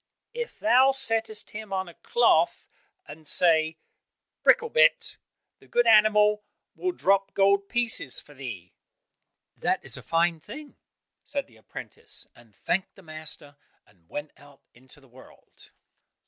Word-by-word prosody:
"If 475 0 -5
thou 250 +5 +5
settest 225 -5 -1
him 215 -1 -8
on 190 -1 -2
a 170 - -11
cloth 475 - +2 0.4
and 155 +1 -12
sayest 160 -2 +2 0.6
'Bricklebrit,' 485 +1 +3 0.4
the - - -21
good 240 0 +2
animal 210 -1 +5 0.3
will 365 - -1
drop 195 - +1
gold 200 0 +3
pieces 235 - 0
for 145 - -11
thee." 115 -11 -8 0.8
"That - - 0
is - - -1
a - - -9
fine 165 0 +1
thing," 295 - -11 0.5
said 285 -1 -3
the 115 - -22
apprentice, 110 - -7
and 115 -4 -21
thanked 190 - -2
the 195 - -16
master, 155 -2 -7 0.3
and 90 -5 -29
went 145 0 -6
out 145 -1 -19
into 130 +4 -13
the 135 - -21
world. 130 +1 -16
190 Hz, 135 wpm, -26 LUFS, 145-225 Hz, 0.8 s, thou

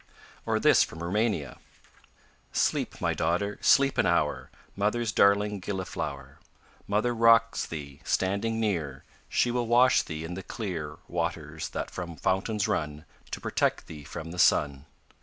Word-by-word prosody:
Or - - +1
this - - +5
from 80 +1 -2
Roumania: 100 - -1 0.9
Sleep, - - 0
my - - 0
daughter, 90 +6 -1
sleep 135 -1 +4
an - - +4
hour; - - 0 0.3
Mother's 105 +3 0
darling 100 0 +3
gilliflower. 80 -8 -5 0.5
Mother 110 +4 +1
rocks 115 0 +4
thee, 70 -3 -8
standing 100 +4 0
near, 85 -11 -2 0.3
She 120 - +2
will 120 -1 -1
wash 125 +2 +5
thee 80 -1 -6
in 85 - -6
the 95 - -5
clear 85 -8 -5
Waters 80 -3 -3
that - - -5
from 85 -2 -6
fountains 100 +3 0
run, 75 -7 -2 0.2
To - - -5
protect - - 0
thee 75 -2 -10
from 80 +4 -7
the 90 - -7
sun. 70 -3 +3
95 Hz, 140 wpm, -28 LUFS, 80-110 Hz, 0.9 s, this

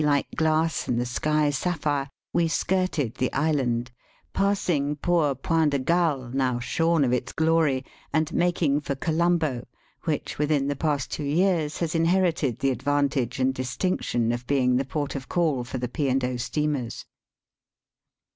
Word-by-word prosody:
like 145 -1 +2
glass 160 -4 +1
and 120 - 0
the 120 - 0
sky 150 +4 +1
sapphire, 145 -2 -1 0.2
we 170 -1 +3
skirted 165 - 0
the 130 - -1
island, 130 -5 0 0.4
passing 175 -7 +1
poor 155 -3 +1
Point 160 +4 +1
de 140 - +1
Galle, 145 -4 0
now 130 -2 +1
shorn 165 +6 +1
of 125 -2 +1
its 125 +1 -1
glory, 160 -5 +2 0.3
and 155 -1 0
making 170 -5 +1
for 140 -1 -3
Colombo, 160 -4 0 0.4
which 155 -3 -2
within 150 -2 +1
the 145 - -1
past 145 -2 -1
two 150 - -3
years 160 0 +1
has 165 -2 -2
inherited 165 - +2
the 135 - +1
advantage 135 0 0
and 130 0 +2
distinction 125 -3 -1
of 120 +1 -4
being 130 -3 +2
the 135 +2 +1
port 145 0 -3
of 135 -2 -6
call 155 -8 +1
for 125 +2 -5
the 125 0 -2
P. 140 +3 -1
and 130 +1 +2
0. 125 0 -1
steamers. 135 -1 -2
145 Hz, 155 wpm, -25 LUFS, 130-160 Hz, 0.4 s, we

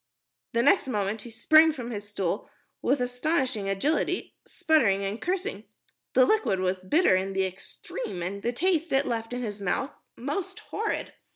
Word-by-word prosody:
The 235 0 +2
next 380 -2 +4
moment 210 -3 -1
he 240 - -9
sprang 310 +7 +5
from 245 -4 -6
his 205 -2 -6
stool 195 -2 -2 0.3
with 275 -2 +1
astonishing 250 -4 0
agility, 300 - 0
spluttering 205 -11 +2
and 200 +4 -4
cursing. 380 +4 -2 0.5
The 255 - +7
liquid 430 - +2
was 185 0 -1
bitter 295 - +4
in 190 +1 -1
the 190 0 +1
extreme, 190 - -6
the 240 - 0
taste 335 +4 +1
it 270 +1 +3
left 225 -1 -3
in 245 0 -3
his 205 -2 -5
mouth 230 +8 -2 0.2
most 290 +9 -4
horrid. 435 0 -2
240 Hz, 160 wpm, -27 LUFS, 195-310 Hz, 0.5 s, The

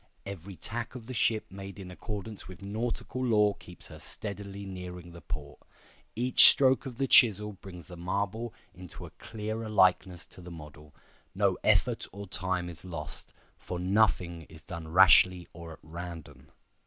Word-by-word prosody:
Every 100 -1 -8
tack 115 +6 -5
of 120 -3 -8
the 130 - -7
ship 110 -2 +2
made 100 +1 -9
in 90 -2 -8
accordance 105 +2 -7
with 95 0 -11
nautical 115 +5 -3
law 105 -4 +3
keeps 90 -2 -13
her - - -11
steadily 100 -1 -5
nearing 90 -2 -8
the 85 0 -12
port. - - -7 0.6
Each 125 +2 +8
stroke 135 0 +3
of 125 -3 -8
the 135 - +1
chisel 105 -5 +5
brings 90 -3 -11
the 90 - -11
marble 100 +6 -2 0.2
into 90 -1 -10
a - - -12
clearer 110 0 -6
likeness 95 -3 +2
to 95 - -14
the 90 - -10
model. 75 -2 -12 0.4
No - - +2
effort - - +2
or 100 +2 -8
time 90 -1 -2
is 85 -1 -7
lost; 85 -5 -6 0.3
for 90 - -5
nothing 90 -3 +1
is 80 0 -14
done 85 -4 -7
rashly 90 +1 +6
or 85 -1 -9
at - - -15
random. 80 -4 -9
95 Hz, 165 wpm, -29 LUFS, 85-110 Hz, 0.6 s, Each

